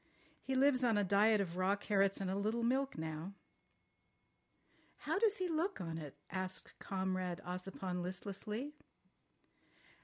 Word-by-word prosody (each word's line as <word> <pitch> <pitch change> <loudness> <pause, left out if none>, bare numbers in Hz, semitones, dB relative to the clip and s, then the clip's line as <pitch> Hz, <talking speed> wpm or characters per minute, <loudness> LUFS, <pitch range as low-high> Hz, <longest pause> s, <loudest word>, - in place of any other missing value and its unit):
He 265 - -2
lives 260 -1 +5
on 230 -3 +4
a 205 - +3
diet 205 +3 +5
of 180 -2 -3
raw 185 +2 +3
carrots 200 -1 +2
and 195 - -2
a - - 0
little 215 +4 0
milk 265 +3 +1
now." 160 +4 -4 1.7
"How - - 0
does 430 -2 +4
he 370 - 0
look 340 +4 0
on 165 -2 -3
it?" 145 -2 -8
asked 185 0 -3
Comrade 185 -2 -1
Ossipon 180 0 -3
listlessly. 205 +8 -3
195 Hz, 140 wpm, -37 LUFS, 185-240 Hz, 1.7 s, lives